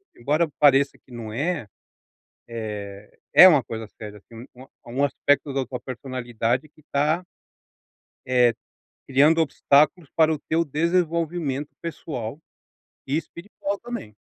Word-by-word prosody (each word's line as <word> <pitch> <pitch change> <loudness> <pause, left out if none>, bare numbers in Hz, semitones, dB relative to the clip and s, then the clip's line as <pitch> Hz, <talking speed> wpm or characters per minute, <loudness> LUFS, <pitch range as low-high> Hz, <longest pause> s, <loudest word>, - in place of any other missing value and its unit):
Embora 150 +6 0
pareça 140 -1 +4
que 130 - -24
não 115 -2 -7
é, 145 +1 -2 0.8
eh, 105 -3 -7 0.2
é 185 - +11
uma 150 -7 +5
coisa 115 -1 -6
séria 105 -1 -11
sim, 115 +2 -10
é 125 - -14
um - - -16 0.2
é - - -12
um 130 +4 -1
aspecto 145 +1 +1
da 135 -1 -1
tua 125 0 -6
personalidade 125 0 -3
que 150 0 -24
tá 155 +5 +1 1.0
eh, 125 -2 +4 0.5
criando 145 +5 +4
obstáculos 150 +1 +2
para 160 -1 +4
o 150 - -4
teu 165 +3 0
desenvolvimento 165 -2 -1
pessoal 145 -6 -6 0.7
e 140 - 0
espiritual 195 +4 -5
também. 235 - -7
140 Hz, 135 wpm, -24 LUFS, 120-160 Hz, 1.0 s, é